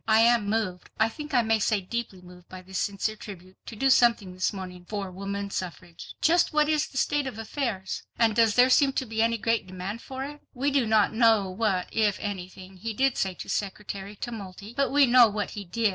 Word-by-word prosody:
I 220 0 +5
am 230 -3 +4
moved, 205 -5 -2
I 220 +1 +4
think 300 +6 -8
I 245 -3 +3
may 225 0 +2
say 215 0 +1
deeply 195 -1 -5
moved 180 0 -15
by 185 0 -10
this 190 0 -5
sincere 205 +2 -1
tribute, 190 -3 -11
to 230 - -7
do 270 +5 +2
something 230 -7 +3
this 185 0 0
morning 185 -3 -8
for 200 -3 -4
woman 200 +1 -5
suffrage. 175 -2 -7
Just 340 +2 +4
what 300 -1 +3
is 310 0 +1
the 265 - -10
state 290 0 +1
of 250 - -6
affairs? 225 -4 -3 0.2
And 225 -2 +3
does 225 -2 +4
there 250 +1 +5
seem 275 0 +4
to 265 - -1
be 220 -1 -2
any 230 0 +2
great 225 -1 0
demand 185 +5 -6
for 265 0 -6
it?" 295 +1 -8
We 280 +3 0
do 270 -4 +2
not 215 -1 +3
know 220 -4 +3
what, 190 -2 0
if 210 -3 +1
anything, 185 -1 -7
he 220 +3 -5
did 270 +1 +2
say 190 -1 -1
to - - -8
Secretary 200 0 -4
Tumulty, 205 -1 -7
but 275 -1 +1
we 285 0 +6
know 245 -1 +7
what 205 -1 -3
he 205 -1 -7
did. 220 +5 +1
215 Hz, 220 wpm, -27 LUFS, 190-240 Hz, 0.2 s, know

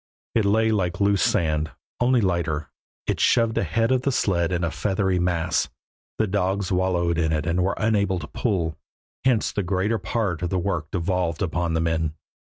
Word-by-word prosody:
It 110 -3 +2
lay 110 +2 +3
like 95 -3 0
loose 100 -1 +3
sand, 80 -5 +1 0.3
only 125 0 +3
lighter; 85 -6 -1 0.3
it - - -1
shoved 115 -2 +3
ahead 115 +7 +1
of 130 -1 +3
the 140 - 0
sled 90 -8 +1
in 90 -1 0
a 85 - 0
feathery 95 -2 0
mass; 90 -1 0 0.5
the 110 - +2
dogs 95 -1 -1
wallowed 90 -2 +1
in 80 -1 +1
it 75 -1 0
and 85 +2 +1
were 95 +2 0
unable 100 -4 +1
to 75 -4 -6
pull, 85 -9 -1 0.5
hence 125 -5 +2
the 100 - -1
greater 100 +4 0
part 95 -3 -2
of 90 - -1
the 95 - 0
work 85 -4 -2
devolved 90 -1 -1
upon 85 -2 -1
the 80 - +1
men. 80 -1 0
90 Hz, 180 wpm, -24 LUFS, 85-105 Hz, 0.5 s, lay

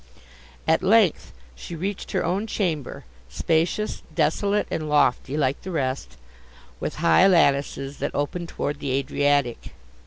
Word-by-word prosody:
At 160 - +3
length 200 -1 +3 0.2
she 170 - -8
reached 190 +5 -4
her - - 0
own 200 +5 -1
chamber, 170 - -3 0.2
spacious, 170 - 0
desolate, 200 +6 +1
and 155 -1 -3
lofty, 145 -1 +2
like 140 -1 0
the 190 - -7
rest, 130 - -3 0.6
with - - -4
high 80 - +5
lattices 140 -5 +2
that - - -3
opened 165 +4 -2
towards 145 0 -3
the 140 - -4
Adriatic. 140 -2 0
155 Hz, 130 wpm, -24 LUFS, 140-185 Hz, 0.6 s, high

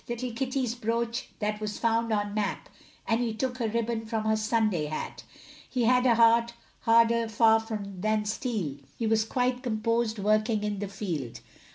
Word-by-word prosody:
Little 240 +1 -3
Kitty's 255 -1 -1
brooch 235 0 -2
that 210 0 -2
was 210 -1 -3
found 230 0 +1
on 205 -1 0
Mapp, 205 -2 -2 0.4
And 225 +1 +2
he 230 -2 -1
took 255 +2 -2
her 230 - 0
ribbon 225 0 -2
from 220 -1 -2
her 220 0 +3
Sunday 215 -6 +1
hat; 155 +1 -5 0.5
He 250 - 0
had 250 +2 +4
a 235 - +5
heart 235 +1 +4 0.3
harder 230 0 +4
far 225 0 +5
than 210 0 -2
steel, 210 - -2 0.2
He 230 - -2
was 220 0 +3
quite 250 +2 0
composed, 230 -1 0
working 215 +1 +1
in 205 -1 -2
the 205 - -3
field. 165 - -5
225 Hz, 170 wpm, -28 LUFS, 210-235 Hz, 0.5 s, a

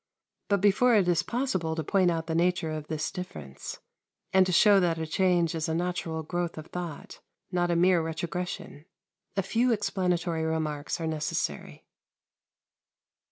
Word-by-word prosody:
But 200 -2 +2
before 215 +5 +4
it 195 -4 +4
is 170 -2 +3
possible 185 -7 -1
to 160 - -2
point 185 +3 +3
out 165 -1 -1
the 165 - -3
nature 170 -1 +1
of 155 -1 -5
this 155 -1 -2
difference, 75 - -7 0.5
and 190 -1 +5
to - - 0
show 200 +3 +6
that 170 -3 +1
the 160 - -2
change 175 0 +2
is 160 -1 -2
a 160 - 0
natural 170 -2 -2
growth 175 +1 -3
of 155 - -6
thought, 175 -4 -6 0.3
not 175 -1 +1
a 170 - +2
mere 175 0 +4
retrogression, 165 -1 -5 0.5
a 195 - +2
few 235 +6 +2
explanatory 180 -6 0
remarks 155 -2 -2
are 165 - -3
necessary. 155 -1 -3
175 Hz, 160 wpm, -28 LUFS, 160-185 Hz, 0.5 s, show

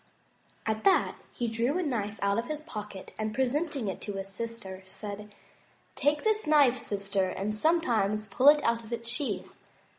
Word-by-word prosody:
At 220 0 -1
that 385 - +4
he 240 - -2
drew 230 +7 +1
a 365 - 0
knife 220 -8 -2
out 200 +2 +2
of 235 - -3
his 305 0 -3
pocket 210 - -8
and, 215 0 -2
presenting 275 0 0
it 190 - -4
to 205 - -4
his 195 0 -4
sister, 195 -3 -5
said; 205 +1 -7 0.6
"Take 295 +1 +1
this 435 -5 +1
knife, 285 -5 +5
sister, 200 -3 -1
and 200 +3 -2
sometimes 215 -7 +2
pull 255 +7 +2
it 295 0 +5
out 230 0 +1
of 225 - -12
its 235 0 -3
sheath. 235 -6 -2
230 Hz, 175 wpm, -29 LUFS, 205-280 Hz, 0.6 s, knife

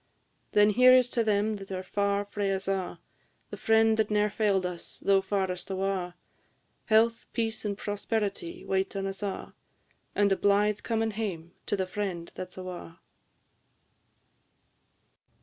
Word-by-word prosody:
Then 210 0 +6
here 250 +4 +7
is 250 -1 +5
to 235 - +2
them 210 0 +1
that 195 -1 -10
are 185 0 -3
far 200 +1 0
frae 205 -1 -2
us 190 0 -3
a', 195 -2 -2 0.5
The - - -4
friend 225 0 +4
that 220 -1 +1
ne'er 210 0 +2
fail'd 200 -3 +1
us, 180 -1 -6
though 195 -1 +3
farest 190 -2 -2
awa'! 190 -2 -2 0.7
Health, 225 +1 +3
peace, 225 -2 -2
and 200 -1 -2
prosperity 205 -4 -3
wait 190 +1 -1
on 195 0 -2
us 195 +1 -5
a'; 200 -2 -4 0.6
And 205 -1 +3
a - - +5
blithe 205 +1 +2
comin' 225 -1 0
hame 190 -6 -4 0.2
to 205 - +1
the 190 - 0
friend 185 -3 -4
that 185 0 -7
's - - -16
awa'! 180 -2 -7
200 Hz, 150 wpm, -28 LUFS, 190-215 Hz, 0.7 s, here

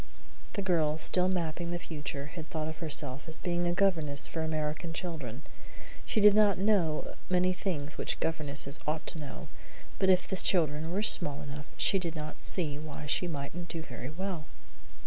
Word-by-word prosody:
The 200 - -2
girl, 160 -4 +2 0.2
in 185 0 +3
mapping 170 0 -2
the 175 - -1
future, 145 -4 -5
had 160 -3 -7
thought 155 -1 -2
of 155 - -6
herself 145 -4 0
as 160 - -5
being 175 0 0
a - - +2
governess 165 -7 +3
for 165 - -3
American 155 +1 -2
children. 155 - -5 0.6
She - - +1
did 210 -1 +8
not 205 -2 +5
know 185 -6 +2 0.2
many 180 0 +3
things 155 -6 -3
which - - -1
governesses 145 -2 -1
ought 155 0 -1
to 165 - -3
know, 145 -2 -7 0.5
but 190 - +3
if 185 -1 +4
the 190 - -1
children 160 -4 +3
were 200 +4 0
small 145 -8 +3
enough, 145 +1 -7
she 195 - +4
did 170 -2 -1
not 155 0 -6
see 150 -6 +1
why 150 -1 -7
she 160 +4 +1
mightn't 165 +2 -5
do 165 -1 -4
very 125 -3 -7
well. 175 0 -4
160 Hz, 180 wpm, -31 LUFS, 150-180 Hz, 0.6 s, did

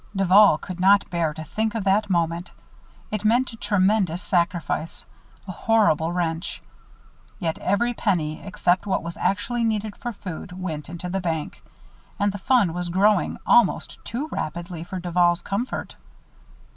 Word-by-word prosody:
Duval 195 -2 +6
could 180 +2 -8
not 200 +2 +5
bear 170 -3 0
to 155 +1 -7
think 220 +8 -2
of 220 - -1
that 200 +2 +2
moment. 170 0 0 0.6
It 210 -1 -2
meant 240 +4 +2
a - - -7
tremendous 195 -4 +1
sacrifice 170 -3 -1 0.4
a - - -4
horrible 175 -5 +2
wrench. 170 -1 -2 0.8
Yet 165 -3 -2
every 235 +6 +1
penny, 170 -9 -1
except 185 0 0
what 190 - 0
was 170 0 -6
actually 235 +4 0
needed 215 -2 -1
for 240 - -5
food, 185 -3 -8
went 160 -5 -5
into 175 +1 -6
the 190 +2 -2
bank. 160 -4 -3 0.6
And 205 0 +2
the 205 - -7
fund 230 -6 +3
was 175 0 -3
growing 195 +2 +2
almost 235 -6 +3
too 260 +7 -4
rapidly 170 +2 -4
for 185 +2 -6
Duval's 175 0 +2
comfort. 220 +6 -3
185 Hz, 150 wpm, -24 LUFS, 170-210 Hz, 0.8 s, Duval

